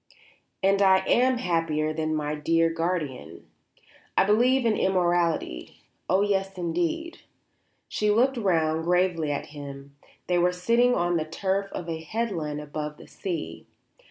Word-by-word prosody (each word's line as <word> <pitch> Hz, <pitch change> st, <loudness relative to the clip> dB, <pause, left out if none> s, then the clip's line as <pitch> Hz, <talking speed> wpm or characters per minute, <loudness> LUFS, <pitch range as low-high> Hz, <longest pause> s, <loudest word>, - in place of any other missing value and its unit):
And 195 Hz, +1 st, +3 dB
I 190 Hz, -1 st, +5 dB
am 255 Hz, +1 st, +3 dB
happier 165 Hz, -6 st, 0 dB
than 155 Hz, 0 st, -1 dB
my 150 Hz, -1 st, -2 dB
dear 165 Hz, +2 st, +1 dB
guardian. 165 Hz, -, -3 dB, 0.7 s
I -, -, +6 dB
believe 240 Hz, +6 st, +3 dB
in 225 Hz, -2 st, +3 dB
immortality; 175 Hz, -, 0 dB, 0.3 s
oh 190 Hz, +2 st, +3 dB
yes, 195 Hz, -1 st, -1 dB
indeed." 175 Hz, -, -2 dB, 0.7 s
She 210 Hz, -, -1 dB
looked 250 Hz, +6 st, +3 dB
round 160 Hz, -6 st, +1 dB
gravely 175 Hz, -3 st, +1 dB
at 145 Hz, -, -4 dB
him 140 Hz, -1 st, -9 dB, 0.3 s
they 180 Hz, -1 st, +1 dB
were 180 Hz, +1 st, +3 dB
sitting 235 Hz, +7 st, +2 dB
on 175 Hz, 0 st, +1 dB
the 155 Hz, -, -1 dB
turf 190 Hz, +4 st, -1 dB
of 175 Hz, -, -6 dB
a 160 Hz, -1 st, -4 dB
headland 165 Hz, -6 st, -3 dB
above 150 Hz, 0 st, -5 dB
the -, -, -13 dB
sea. 165 Hz, -, -6 dB
175 Hz, 140 wpm, -26 LUFS, 155-195 Hz, 0.7 s, I